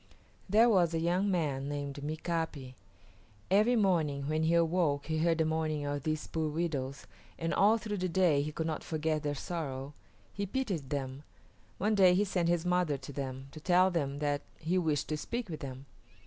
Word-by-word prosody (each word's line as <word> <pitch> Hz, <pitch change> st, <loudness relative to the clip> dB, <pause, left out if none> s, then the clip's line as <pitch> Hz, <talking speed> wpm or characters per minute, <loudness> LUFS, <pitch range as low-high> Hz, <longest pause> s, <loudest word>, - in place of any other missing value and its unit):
There 220 Hz, +4 st, +6 dB
was 175 Hz, -7 st, +3 dB
a -, -, +1 dB
young 180 Hz, +4 st, +1 dB
man 145 Hz, -7 st, -1 dB
named 145 Hz, -1 st, -4 dB
Mika´pi. 155 Hz, -3 st, -3 dB, 0.8 s
Every 215 Hz, +5 st, +5 dB
morning 160 Hz, -10 st, +1 dB
when 155 Hz, +1 st, 0 dB
he 160 Hz, +1 st, +3 dB
awoke 165 Hz, -4 st, +2 dB
he 160 Hz, -1 st, -1 dB
heard 165 Hz, 0 st, +2 dB
the 160 Hz, -, +2 dB
mourning 155 Hz, -2 st, -1 dB
of 145 Hz, 0 st, -2 dB
these 155 Hz, +1 st, -2 dB
poor 160 Hz, -1 st, -2 dB
widows, 145 Hz, -4 st, -3 dB, 0.3 s
and 165 Hz, 0 st, -2 dB
all 210 Hz, +3 st, +5 dB
through 215 Hz, -2 st, -4 dB
the 185 Hz, 0 st, -1 dB
day 170 Hz, -5 st, +3 dB
he 150 Hz, +2 st, -3 dB
could 160 Hz, +1 st, -3 dB
not 160 Hz, -1 st, -3 dB
forget 155 Hz, -1 st, -1 dB
their 145 Hz, -1 st, -2 dB
sorrow. 140 Hz, -4 st, -4 dB, 0.4 s
He 200 Hz, 0 st, -3 dB
pitied 190 Hz, -, -2 dB
them. 135 Hz, -1 st, -3 dB, 0.6 s
One 210 Hz, +3 st, +1 dB
day 185 Hz, -3 st, +6 dB
he 200 Hz, -, +3 dB
sent 180 Hz, -4 st, 0 dB
his 175 Hz, 0 st, +1 dB
mother 180 Hz, -5 st, +1 dB
to 135 Hz, +1 st, -9 dB
them, 135 Hz, -1 st, -5 dB
to 155 Hz, -, -9 dB
tell 180 Hz, +3 st, +4 dB
them 140 Hz, -5 st, -1 dB
that 145 Hz, -1 st, 0 dB, 0.2 s
he 165 Hz, +3 st, -1 dB
wished 155 Hz, -5 st, 0 dB
to 155 Hz, -, -1 dB
speak 235 Hz, +6 st, -4 dB
with 155 Hz, -, -5 dB
them. 135 Hz, -1 st, -7 dB
160 Hz, 190 wpm, -31 LUFS, 145-180 Hz, 0.8 s, There